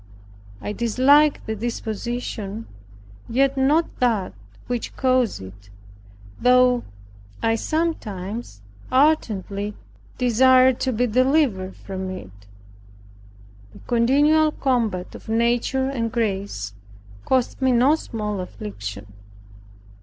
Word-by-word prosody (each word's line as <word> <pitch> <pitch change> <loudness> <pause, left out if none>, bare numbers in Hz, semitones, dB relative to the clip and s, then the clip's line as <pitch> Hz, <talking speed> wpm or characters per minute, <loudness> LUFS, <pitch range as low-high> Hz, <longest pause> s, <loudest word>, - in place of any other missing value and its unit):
I 210 - -4
disliked 275 +7 +3
the 220 - -3
disposition, 225 -1 -4 0.6
yet 270 +3 +2
not 290 +5 +3
that 225 -7 +1 0.3
which 245 -2 -4
caused 255 - +1
it, 100 +1 -13 0.7
though 250 -1 +4 0.6
I 225 - +3
sometimes 220 - -3 0.3
ardently 210 -8 +1 0.4
desired 255 +1 +4
to 260 - 0
be 245 +1 +1
delivered 250 -5 +1
from 190 -1 -6
it. 185 - -7 1.4
The - - -14
continual 290 +6 +3
combat 230 -9 -1
of - - -12
nature 240 +3 +1
and 235 -4 -2
grace 195 - -2 0.5
cost 260 0 0
me 260 -1 +3
no 250 +4 +4
small 210 -9 -3
affliction. 100 - -7
235 Hz, 95 wpm, -22 LUFS, 200-260 Hz, 1.4 s, though